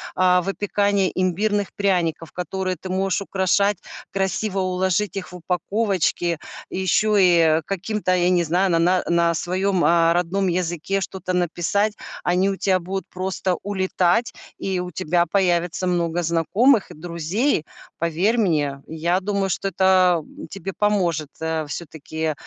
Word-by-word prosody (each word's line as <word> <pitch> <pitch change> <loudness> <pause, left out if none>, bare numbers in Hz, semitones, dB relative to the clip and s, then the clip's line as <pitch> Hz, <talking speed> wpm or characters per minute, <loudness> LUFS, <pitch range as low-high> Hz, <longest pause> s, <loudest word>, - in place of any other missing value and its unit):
а, 180 -1 +4
выпекания 200 0 0
имбирных 200 +3 0
пряников, 175 -5 0
которые 185 +1 -3
ты 185 - -8
можешь 190 +1 0
украшать, 195 +1 +1 0.3
красиво 195 +1 -1
уложить 185 +2 0
их 185 -3 -6
в - - -10
упаковочки, 180 -1 0 0.3
еще 190 +3 +1
и, 175 -2 +5
э, 160 -1 +4
каким-то, 195 0 -1
я 175 0 +2
не 180 -1 +3
знаю, 180 +4 +1
на 165 - +3
на 180 +2 +2
на 170 0 +2
своем, 185 +2 0
э, 165 +1 +4
родном 180 +3 0
языке 180 +2 -1
что-то 190 -1 -4
написать. 180 +4 0 0.3
Они 180 +2 +2
у 195 - -1
тя 190 -1 +2
будут 190 +1 -4
просто 185 0 -2
улетать, 190 +2 +1 0.2
и 190 -2 -2
у 180 0 -4
тебя 170 +2 +1
появится 175 0 0
много 175 -1 0
знакомых 195 - +2
и - - -8
друзей. 170 - -1 0.4
Поверь 170 +8 +1
мне. 150 -10 0
Я 170 +3 0
думаю, 200 0 -1
что 195 +2 -1
это, 185 -2 +3
м, 285 +3 -11
тебе 195 -1 -6
поможет, 175 -8 +1
э, 160 -1 -2
все-таки, 160 0 -4
185 Hz, 145 wpm, -22 LUFS, 170-195 Hz, 0.4 s, и